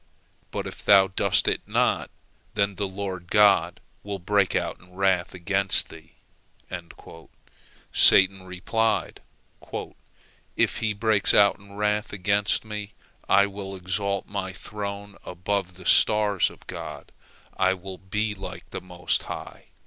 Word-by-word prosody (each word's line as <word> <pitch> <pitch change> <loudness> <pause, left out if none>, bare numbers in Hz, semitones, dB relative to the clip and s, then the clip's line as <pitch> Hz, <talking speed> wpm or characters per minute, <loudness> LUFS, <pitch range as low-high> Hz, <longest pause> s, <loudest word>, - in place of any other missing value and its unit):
But - - -4
if - - -8
thou 95 -1 +6
doest 95 - +3
it - - +1
not, - - +1 0.5
then 100 0 +1
the 100 +1 -3
Lord 95 -2 -6
God 100 -5 +4 0.2
will 100 -1 -5
break 100 +1 +1
out - - -1
in 90 0 -19
wrath 95 -2 +1
against 95 +2 +2
thee." 80 0 -14 1.8
Satan 95 0 +5
replied: 95 +5 -1 1.3
"If - - +2
He 110 -2 -1
breaks 105 -1 +2
out 100 -1 +5
in 100 0 -15
wrath 105 0 0
against 100 +2 +1
me, 105 -1 -6 0.4
I 100 - +6
will 100 -1 -6
exalt 100 +2 -2
my 95 -2 -4
throne 100 +2 -6
above 95 +1 -3
the 90 0 -13
stars 105 -2 +4
of - - -16
God, - - -8 0.4
I 95 0 +2
will 95 0 -9
be 105 +3 -2
like 95 -1 -8
the - - -5
Most 90 -1 -1
High!" - - -8
100 Hz, 135 wpm, -25 LUFS, 95-105 Hz, 1.8 s, thou